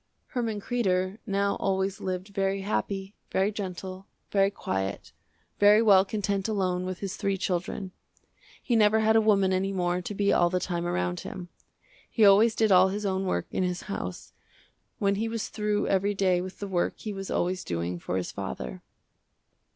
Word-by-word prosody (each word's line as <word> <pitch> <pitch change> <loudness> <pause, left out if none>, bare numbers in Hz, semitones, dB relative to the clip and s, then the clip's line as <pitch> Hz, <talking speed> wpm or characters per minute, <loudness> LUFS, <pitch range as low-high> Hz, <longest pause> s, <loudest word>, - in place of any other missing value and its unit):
Herman 230 -4 -2
Kreder 195 -3 0
now 200 0 +1
always 190 0 -1
lived 185 +1 -3
very 195 -1 -1
happy, 195 -1 -2 0.2
very 195 +2 +1
gentle, 190 -1 -6 0.2
very 195 -1 +4
quiet, 95 - -4 0.5
very 205 +1 +7
well 200 -4 +6
content 200 -1 -1
alone 185 -4 -1
with 185 -1 -5
his 195 0 -3
three 200 -1 0
children. 185 +1 -3 0.7
He 240 - +1
never 220 0 +4
had 220 0 +3
a 225 - +6
woman 195 -3 +3
any 190 +1 0
more 180 -1 0
to 205 +3 -6
be 200 0 +2
all 175 - +4
the 180 +1 0
time 175 -1 -2
around 90 - -1
him. 180 -2 -7 0.6
He 220 - +4
always 210 +3 +6
did 220 -2 +2
all 185 0 +7
his 205 +2 -3
own 190 -1 -1
work 85 - 0
in - - -1
his 180 -1 -1
house, 90 - -6 0.6
when 200 -1 +2
he 225 - 0
was 225 -1 -3
through 210 -1 -1
every 200 +1 +1
day 185 -2 +2
with 185 +1 -7
the 200 - -5
work 180 -3 -1
he 215 - -5
was 195 -1 -6
always 180 +1 -1
doing 85 +1 -3
for 90 - -3
his 90 - -3
father. 60 -1 -6
195 Hz, 180 wpm, -27 LUFS, 180-205 Hz, 0.7 s, very